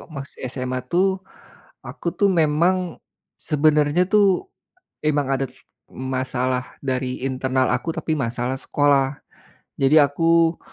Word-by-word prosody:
masih 140 -4 -7
SMA 130 0 -3
tuh, 190 +2 +1 0.6
aku - - -5
tuh 200 - +2
memang, 175 +1 +1 0.4
sebenarnya 150 +2 +2
tuh, 205 - +3 0.6
emang 145 -2 +1
ada 135 0 0 0.4
masalah 130 -1 -2
dari 130 -1 -2
internal 130 0 0
aku, 165 - -2
tapi 160 0 -2
masalah 125 0 -2
sekolah. 140 -1 +2 0.6
Jadi 140 +3 +5
aku 165 +3 +2
145 Hz, 105 wpm, -22 LUFS, 130-165 Hz, 0.6 s, Jadi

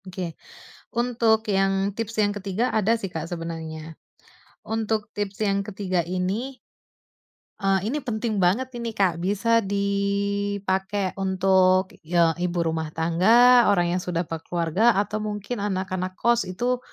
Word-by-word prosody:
Oke. 180 -2 -5 0.6
Untuk 230 -2 +1
yang, 195 +1 +1
tips 230 0 -4
yang 205 0 +1
ketiga 205 +4 -2
ada 220 +2 +2
sih 195 - -4
Kak, 160 0 -4
sebenarnya. 160 -2 -6 0.7
Untuk, 220 -1 -1
tips 205 -1 -4
yang 200 0 +1
ketiga 190 -3 -1
ini 195 +9 -3 1.0
eee, 195 0 +1
ini 300 - -1
penting 230 -5 -2
banget 205 +9 +1
ini 230 -2 -4
Kak, 185 -5 +1
bisa 205 +6 +2
dipakai 200 -1 -1
untuk, 190 0 +3
ya 170 0 +3
ibu 175 0 -1
rumah 160 -1 -2
tangga, 225 +10 +5
orang 175 -4 +3
yang - - -3
sudah 175 -1 -2
bekeluarga 170 +6 0
atau 205 +2 0
mungkin 210 +2 -4
anak-anak 185 -2 -2
kos, 235 +2 +1
itu 245 +7 -1
195 Hz, 130 wpm, -24 LUFS, 180-220 Hz, 1.0 s, tangga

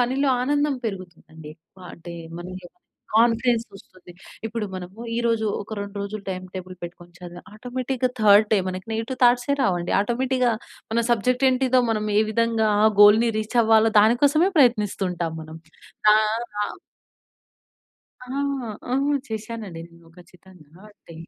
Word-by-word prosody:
పనిలో 260 +3 +1
ఆనందం 290 +2 +1
పెరుగుతుందండి. 170 -6 -8 0.3
ఆహ్, 180 - -11
అంటే 170 +1 -10 0.3
మన 175 - -7 0.7
కాన్ఫిడెన్స్ 230 +1 +3
వస్తుంది. 185 -2 -15 0.3
ఇప్పుడు 225 -1 -4
మనము 185 +3 -8 0.2
ఈరోజు 230 -2 0 0.2
ఒక 220 - -7
2 200 0 -7
రోజులు 200 +1 -6
టైమ్‌టేబుల్ 185 0 -7
పెట్టుకొని 175 0 -10
చదివి 175 -1 -10
ఆటోమేటిక్‌గా 250 +2 -3
3ర్డ్ 210 0 +6
డే 210 - +5
మనకి 185 +3 -6
నెగెటివ్ 225 +4 -4
థాట్సే 245 +3 +3
రావండి. 175 -6 0
ఆటోమేటిక్‌గా 250 +3 0 0.4
మన 235 +1 +2
సబ్జెక్ట్ 250 +3 +1
ఏంటిదో 255 0 +2
మనం 215 -1 -1
ఏ - - +5
విధంగా 225 0 +1 0.2
ఆ - - +7
గోల్‌ని 215 +3 +7
రీచ్ 215 +3 -4
అవ్వాలో 225 0 +4
దాని 220 +3 +4
కోసమే 310 +7 +3
ప్రయత్నిస్తూ 210 -7 +2
ఉంటాం 170 -2 -3
మనం. 160 +1 -10 0.6
ఆహ్ 215 +2 +1 0.2
ఆ - - 0 1.6
ఆ! - - -16 0.6
ఆ! - - +2 0.3
చేశానండి 220 -5 -6
నేను 170 -1 -20
ఖచ్చితంగా. 180 -1 -18
అంటే 170 - -16
215 Hz, 135 wpm, -23 LUFS, 185-240 Hz, 1.6 s, ఆ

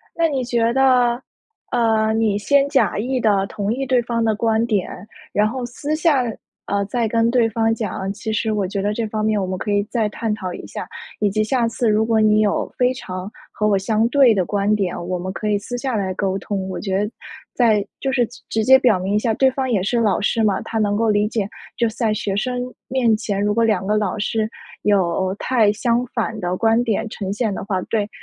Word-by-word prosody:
那 335 -1 +2
你 270 -4 -1
觉 235 -1 +1
得， 250 -2 +3 0.5
呃， 220 -2 +2
你 220 -2 +1
先 280 +6 +3
假 275 -7 +2
意 255 +4 -1
地 200 -4 +2
同 205 +1 -3
意 270 +3 -2
对 250 -1 +2
方 230 -1 -1
的 220 - +2
观 225 +1 +1
点， 205 -6 0 0.4
然 210 +1 +2
后 255 +2 -4
私 285 +5 -3
下， 310 -4 +3 0.4
呃， 200 0 0
再 235 +2 -1
跟 230 +1 +2
对 235 -2 +3
方 225 0 +1
讲： 195 -3 -3
“其 215 +2 -5
实 220 +1 0
我 205 -3 0
觉 195 +1 -3
得 205 +1 0
这 225 +1 -2
方 215 0 -2
面 215 -1 +1
我 190 - -1
们 185 0 -3
可 205 - -4
以 205 0 +2
再 220 0 -1
探 215 +1 -2
讨 185 -4 -5
一 - - -8
下， - - -6 0.3
以 205 -1 +2
及 215 +2 +1
下 240 +1 +1
次 230 +1 -1
如 215 +1 +3
果 225 -1 +2
你 215 0 +4
有 210 -1 +1
非 250 0 +3
常 185 -6 -6 0.2
和 210 - -1
我 200 -2 +3
相 215 +3 +1
对 260 -3 +5
的 190 -3 +1
观 205 +3 +1
点， 195 -4 -1
我 185 -1 -1
们 185 +2 -4
可 210 +2 -3
以 210 - +2
私 245 +4 -6
下 260 0 -2
来 190 -2 -1
沟 190 0 -1
通。” 195 -2 -4
我 185 - -4
觉 195 -2 -1
得 210 - -2 0.4
再 220 -5 +3 0.2
就 270 -1 -1
是 245 -3 +2 0.2
直 220 -1 0
接 265 +3 +7
表 240 -7 +3
明 190 +3 -2
一 - - +4
下， 225 +1 0
对 265 +4 +4
方 260 -1 -2
也 215 -5 +2
是 235 +5 0
老 210 -4 +2
师 225 +3 +1
嘛， 205 -3 +2
他 225 - -3
能 205 -1 +1
够 225 +1 +1
理 210 0 +3
解。 210 -3 -2 0.3
就 235 -1 +2
是 220 - -8
在 225 -3 0
学 200 -2 -2
生 250 +3 -1 0.3
面 245 -4 +2
前， 205 -2 -2
如 205 0 +1
果 230 +1 +2
两 205 -4 +1
个 210 - +2
老 210 -1 -1
师 215 +1 -1 0.3
有 190 -2 +1
太 225 -5 +2
相 235 +2 0
反 225 -1 -2
的 180 -1 -1
观 225 +3 +3
点 225 -1 -1
呈 195 -2 -4
现 215 -1 -1
的 - - -5
话， 195 -2 -1
对 210 0 -1
220 Hz, 255 characters per minute, -20 LUFS, 205-235 Hz, 0.5 s, 接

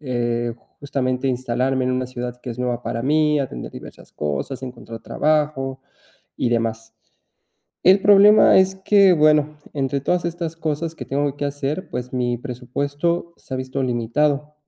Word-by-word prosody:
eh, 120 -3 -1 0.3
justamente, 135 -2 -1
instalarme 130 +1 0
en 130 - 0
una 130 0 -1
ciudad 125 -1 -6
que 125 - -6
es 115 - -7
nueva 125 -1 -2
para 115 - -3
mí, 150 +2 +2
atender 130 - -4
diversas - - -12
cosas, 75 - -3
encontrar 120 -2 -9
trabajo 150 -3 0 0.6
y 125 - 0
demás. 115 -1 -2 0.9
El 190 +2 +6
problema 205 +1 +7
es 190 0 +3
que, 195 0 +5
bueno, 150 -2 +3 0.2
entre 140 -1 -1
todas 175 +6 0
estas 170 -1 -4
cosas 160 0 -3
que - - -7
tengo 140 0 -1
que 145 - -5
hacer, 145 +5 -3
pues, 125 +1 -5
mi 120 -1 0
presupuesto 145 +7 -3
se - - -11
ha - - -1
visto 130 +1 -3
limitado 140 +5 0
135 Hz, 155 wpm, -21 LUFS, 125-155 Hz, 0.9 s, problema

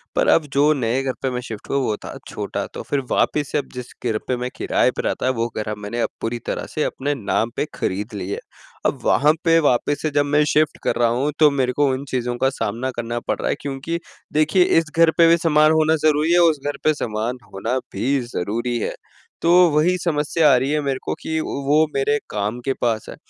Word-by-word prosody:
पर - - +2
अब 160 - +4
जो 145 +2 +4
नए 125 -1 0
घर 130 -1 -1
पे 130 - 0
मैं 125 0 -3
शिफ्ट 110 -4 -9
हुआ 140 - +1
वो 110 -3 0
था - - -7
छोटा - - -4
तो - - -6
फिर 140 - +1
वापिस 145 -2 +1
से - - +1
अब 145 - -2
जिस 125 -1 -7
घर 110 -2 +1
पे 125 - +1
मैं 125 +1 -3
किराए - - +1
पे - - -4
रहता 130 - -1
वो 115 - +1
घर 105 0 -2
मैंने 105 +3 -4
अब - - 0
पूरी 120 +1 -2
तरह - - -3
से 155 - 0
अपने 145 +2 -2
नाम 115 0 -1
पे - - 0
ख़रीद 105 +4 -3
लिया 100 -1 -4
है। - - -6 0.5
अब - - -14
वहाँ 150 +2 +4
पे 165 -1 +4
वापस 145 0 +1
से 155 - 0
जब 145 - +3
मैं 150 +1 +3
शिफ्ट 155 -1 +2
कर - - 0
रहा 120 -1 +3
हूँ 135 +5 0
तो 150 -1 +7
मेरे 130 -2 0
को 145 - +4
उन 130 +1 -3
चीज़ों 125 -1 -1
का 135 - +5
सामना 130 0 -3
करना 120 0 -3
पड़ - - -1
रहा - - -1
है - - +1
क्योंकि 145 +5 -4 0.3
देखिए 155 +4 +4 0.2
इस 155 -2 -5
घर 165 -1 +6
पे 165 -1 +7
भी 170 +1 +5
सामान 155 -2 +4
होना 160 0 +3
ज़रूरी 155 +2 +3
है 175 - +5
उस 150 - -7
घर 145 -1 -2
पे 155 - +4
सामान 115 -1 -3 0.2
होना 115 +7 -1 0.2
भी 135 +3 0 0.2
ज़रूरी 120 +6 -1
है। - - -3 0.5
तो 170 - +3 0.2
वही 165 +5 +3
समस्या 150 -1 +2
आ - - +6
रही 130 +2 0
है 150 - +1
मेरे 135 -2 -2
को - - -2
कि 160 0 -2
वो 145 +3 +1
मेरे 140 +2 +2
काम 105 +3 -2
के 135 - +1
पास 115 -2 0
है। - - -7
135 Hz, 235 wpm, -21 LUFS, 120-150 Hz, 0.5 s, तो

